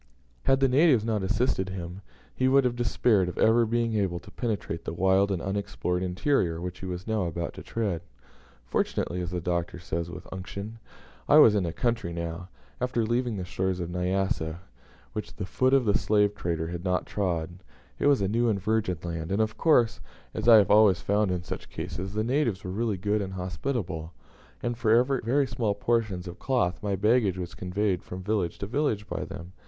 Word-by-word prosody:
Had 135 0 +3
the 135 - +5
natives 130 -4 +4
not 110 -3 0
assisted 100 -1 0
him, 90 0 -6 0.3
he 130 - +2
must 135 +1 +5
have 125 -1 0
despaired 115 -5 +2
of - - -8
ever 115 +1 +4
being 115 0 0
able 95 -5 0
to - - -14
penetrate 105 -8 -3
the - - -5
wild 95 +2 +3
and 90 -4 -2
unexplored 95 -2 -2
interior 90 - 0
which 90 +1 -6
he 95 - -6
was 90 0 -5
now 110 -4 0
about 85 0 -3
to - - -9
tread. 100 -8 -2 0.6
"Fortunately," 90 +7 -1
as 90 - -3
the 90 0 -2
Doctor 85 0 -2
says 85 0 -4
with 90 +1 -9
unction, 100 +4 -7 0.5
"I 150 - +7
was 115 -8 +8
in 100 -4 +1
a - - -2
country 115 -4 -1
now, 85 +2 -5 0.3
after 125 -2 0
leaving 120 -1 0
the 90 - -4
shores 95 0 -2
of 85 -1 -4
Nyassa, 90 -2 -1 0.5
which 105 - -5
the 100 - -4
foot 115 +8 +1
of 135 -2 +4
the 105 -1 +2
slave 105 -1 +3
trader 85 -4 -2
has 85 0 -5
not 90 -1 0
trod; 85 -3 -2 0.4
it - - +2
was 140 -6 +4
a - - +2
new 115 +4 +2
and 100 -3 +1
virgin 105 -2 0
land, 85 0 -4
and 100 - +1
of 110 0 +1
course, 125 -5 +3 0.3
as 110 +1 -3
I 115 - +10
have 100 -2 +4
always 105 -4 +6
found 105 0 +1
in 90 -2 -2
such - - -6
cases, 95 +2 -5
the 110 - +1
natives 120 -5 0
were 90 - -4
really 110 0 -1
good 105 +3 0
and 95 -1 -4
hospitable, 90 - -3 0.5
and 120 0 -1
for 115 +1 +4 0.2
very 135 +5 +2
small 115 -4 -1
portions 105 -5 0
of 85 - -8
cloth 120 -10 0
my 100 -1 -1
baggage 105 -1 +2
was 90 -1 -5
conveyed 95 0 -1
from 90 +1 -8
village 95 -4 -1
to - - -4
village 110 -3 -1
by - - -3
them." 90 -3 -9
100 Hz, 200 wpm, -27 LUFS, 90-115 Hz, 0.6 s, I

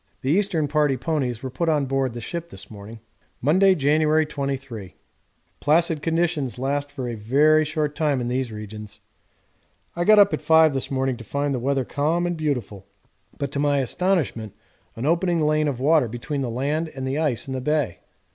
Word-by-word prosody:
The 135 - +1
Eastern 175 -4 +1
Party 145 -2 +1
ponies 130 -4 -2
were 130 - -4
put 165 +6 -1
on 150 -3 +2
board 135 -2 -1
the 120 - -6
ship 170 +7 -5
this - - -10
morning. 105 +2 -10 0.4
Monday, 185 +8 +4
January 155 +1 +3
23. 135 -9 -5 0.6
Placid 160 +1 +2
conditions 165 -7 0
last 140 +2 -2
for 135 -3 -5
a 120 - -3
very 145 +8 +3
short 155 -1 -2
time 150 -3 0
in 120 - -3
these 125 -1 -2
regions. 105 0 -8 1.0
I 175 - 0
got 215 +4 +6
up 200 -1 +6
at - - -2
5 160 -2 +5
this 135 - -3
morning 130 -2 -1
to 115 - -10
find 140 +5 -2
the 130 - -1
weather 135 +1 0
calm 160 +7 0
and 175 0 -1
beautiful, 125 - -3 0.5
but 140 -1 -3
to 140 - -3
my 145 0 +2
astonishment 135 - -1 0.4
an 115 - -4
opening 170 +2 +1
lane 155 0 +2
of 135 -4 -2
water 150 -1 +3
between 135 +6 -4
the 130 - -2
land 145 +7 -1
and 135 -1 -4
the 135 +3 -1
ice 145 -7 -1
in 135 - -4
the 130 - -3
bay. 150 - -1
140 Hz, 190 wpm, -23 LUFS, 125-155 Hz, 1.0 s, got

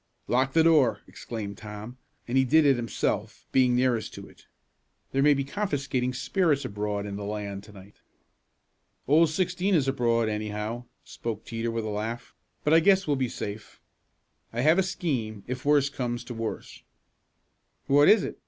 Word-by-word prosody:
"Lock 130 +2 +1
the 160 - +5
door!" 155 -7 +4
exclaimed 105 -4 -7
Tom, 105 +4 -9 0.3
and 120 - -2
he 130 - +5
did 155 +4 +4
it 140 -2 +5
himself, 115 -2 -2
being 125 -2 +4
nearest 125 -3 0
to - - -9
it. - - -20 0.6
"There 135 - +1
may 145 +1 +5
be 140 - -1
confiscating 140 -7 -2
spirits 150 -3 +1
abroad 105 -2 -3
in 100 -1 -5
the 105 - -6
land 100 -1 -5
to 105 - -14
night." 100 0 -15 1.1
"Old 155 +4 +5
Sixteen 180 +3 0
is 140 -5 +2
abroad, 115 -4 +1
anyhow," 105 +2 -3 0.2
spoke 110 -2 -6
Teeter 115 0 -3
with 115 -1 -2
a - - -3
laugh, 110 +3 -4 0.3
"but 150 - +3
I 165 - +8
guess 195 +3 +4
we'll 145 - +1
be 130 -2 -1
safe. 100 -1 -7 0.7
I 120 - -2
have 155 +7 +4
a - - +4
scheme, 130 - -3
if 125 +1 -5
worst 140 -1 +3
comes 120 -2 -3
to 125 - -7
worst." 115 -1 -6 1.0
"What 145 +2 +5
is 215 -1 +6
it?" - - -6
125 Hz, 170 wpm, -27 LUFS, 110-145 Hz, 1.1 s, I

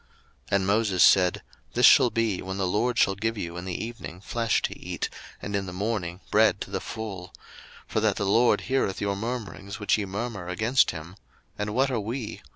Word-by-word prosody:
02:016:008 - - +1
And 95 -1 +2
Moses 100 -2 +3
said, 90 -2 +5 0.3
This 125 - +5
shall 130 -3 +8
be, 115 -4 0
when 95 +1 -5
the 95 - 0
LORD 115 +6 0
shall 100 - +4
give 110 +3 -2
you 85 -3 -5
in 85 +1 -6
the 95 +3 -3
evening 115 -7 -8
flesh 115 +3 0
to - - -2
eat, - - -4 0.3
and 100 - -3
in 100 -1 -2
the - - -5
morning 95 -2 -3
bread 110 +1 +4
to - - -6
the - - -2
full; 100 -5 -6 0.5
for - - -1
that - - +2
the 100 - -2
LORD 115 +5 +4
heareth 130 -8 0
your 100 -1 -1
murmurings 105 -3 -5
which 105 +1 +2
ye 105 - -1
murmur 100 -1 -4
against 115 +9 +2
him: 85 +4 -7 0.4
and 105 +1 -3
what 135 +1 +2
are 120 - 0
we? 115 +2 -5
105 Hz, 205 wpm, -26 LUFS, 95-115 Hz, 0.5 s, shall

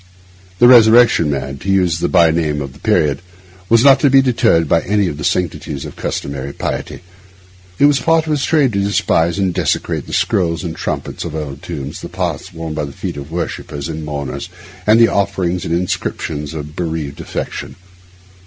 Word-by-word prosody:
The 120 - +6
Resurrection 115 -8 +6
Man—to 70 +5 -4
use 90 -4 +2
a - - 0
byname 80 -4 +2
of 70 -2 -6
the 70 - -17
period—was 90 - 0
not 140 -1 +7
to 145 - +4
be 135 +1 +6
deterred 115 - +2
by 80 - +3
any 105 +1 +1
of 75 -3 -5
the - - -5
sanctities 75 -4 -2
of - - -9
customary 70 0 -4
piety. - - -4 0.8
It 145 - +4
was 145 -2 +4
part 165 +4 +2
of 155 - -3
his 145 -2 0
trade 145 -7 +2
to 100 - 0
despise 85 -4 +1
and 95 -2 0
desecrate - - -1
the - - -8
scrolls 85 -2 0
and 80 -2 -4
trumpets - - -4
of - - -6
old 70 -3 -5
tombs, 70 +2 -6
the - - -7
paths - - -4
worn 80 -1 -6
by 75 -1 -2
the 70 - -8
feet 70 - -6
of 70 0 -8
worshippers 75 -4 -4
and 80 0 -5
mourners, 70 +1 -5 0.4
and 110 +2 +6
the 115 - +7
offerings 90 -4 -1
and 80 - -2
the - - +1
inscriptions 75 -4 -3
of 75 0 -7
bereaved 80 -5 -4
affection. - - -5
85 Hz, 185 wpm, -17 LUFS, 75-100 Hz, 0.8 s, not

